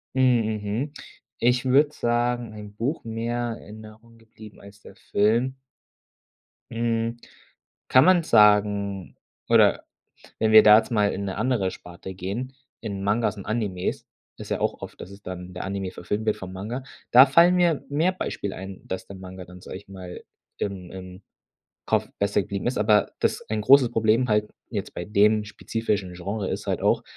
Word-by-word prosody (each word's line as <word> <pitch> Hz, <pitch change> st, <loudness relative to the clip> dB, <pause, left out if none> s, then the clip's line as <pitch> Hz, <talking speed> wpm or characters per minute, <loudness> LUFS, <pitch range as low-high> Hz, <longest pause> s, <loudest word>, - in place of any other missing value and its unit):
Hm, 125 Hz, -3 st, +4 dB, 0.2 s
mhm. 115 Hz, +9 st, -3 dB, 0.4 s
Ich 125 Hz, +2 st, +2 dB
würde 140 Hz, +3 st, +4 dB
sagen 120 Hz, 0 st, -1 dB
ein 105 Hz, -1 st, -10 dB
Buch 125 Hz, +9 st, -2 dB
mehr 115 Hz, +1 st, -3 dB
in 110 Hz, 0 st, -12 dB
Erinnerung 110 Hz, +2 st, -16 dB
geblieben 110 Hz, -1 st, -15 dB
als 100 Hz, +1 st, -15 dB
der -, -, -14 dB
Film. 120 Hz, +6 st, 0 dB, 1.1 s
Mhm, 115 Hz, 0 st, -1 dB, 0.7 s
kann 130 Hz, +2 st, +6 dB
man 185 Hz, -2 st, +5 dB
sagen, 105 Hz, -, +3 dB, 0.3 s
oder -, -, +4 dB, 0.5 s
wenn 110 Hz, 0 st, +2 dB
wir 110 Hz, 0 st, +9 dB
da 105 Hz, 0 st, +9 dB
jetzt 110 Hz, +2 st, -1 dB
mal 105 Hz, -3 st, +2 dB
in 100 Hz, -, -4 dB
'ne 95 Hz, -1 st, -4 dB
andere 115 Hz, -7 st, 0 dB
Sparte 90 Hz, +2 st, -10 dB
gehen, 105 Hz, +9 st, -5 dB, 0.3 s
in 100 Hz, -3 st, -5 dB
Mangas 105 Hz, +1 st, 0 dB
und 100 Hz, -, -8 dB
Animes. 105 Hz, -5 st, -2 dB, 0.3 s
Ist -, -, -9 dB
ja -, -, 0 dB
auch -, -, -1 dB
oft, -, -, -9 dB
dass 95 Hz, -, -9 dB
es 100 Hz, 0 st, -13 dB
dann 90 Hz, -1 st, -7 dB
in 90 Hz, -, -13 dB
der 90 Hz, -, -5 dB
Anime 95 Hz, -1 st, -4 dB
verfilmt 105 Hz, +5 st, -4 dB
wird 110 Hz, -, +1 dB
vom 95 Hz, -1 st, -8 dB
Manga, 110 Hz, +8 st, -5 dB, 0.3 s
da 125 Hz, +2 st, +9 dB
fallen 170 Hz, +6 st, +5 dB
mir 170 Hz, -5 st, +2 dB
mehr 155 Hz, +6 st, +2 dB
Beispiele 100 Hz, -, -4 dB
ein, 95 Hz, 0 st, -8 dB
dass 95 Hz, 0 st, -5 dB
der 100 Hz, -, -10 dB
Manga 95 Hz, 0 st, -9 dB
dann, 90 Hz, +1 st, -13 dB
sage -, -, -9 dB
ich 100 Hz, -, -16 dB
mal, 90 Hz, -2 st, -9 dB, 0.4 s
im 95 Hz, -3 st, -4 dB
im 95 Hz, 0 st, -10 dB, 0.7 s
Kopf -, -, +1 dB
besser 100 Hz, 0 st, +1 dB
geblieben 100 Hz, +1 st, -5 dB
ist. 125 Hz, -, -2 dB
Aber 105 Hz, 0 st, +3 dB
das -, -, 0 dB
ein 110 Hz, 0 st, -1 dB
großes 130 Hz, 0 st, +6 dB
Problem 115 Hz, +2 st, +2 dB
halt 105 Hz, 0 st, +1 dB, 0.2 s
jetzt -, -, -5 dB
bei 85 Hz, -, -5 dB
dem 105 Hz, +2 st, +3 dB
spezifischen 105 Hz, -3 st, -3 dB
Genre 95 Hz, +3 st, -4 dB
ist -, -, -4 dB
halt -, -, -1 dB
auch, -, -, +2 dB
105 Hz, 175 wpm, -25 LUFS, 100-120 Hz, 1.1 s, wir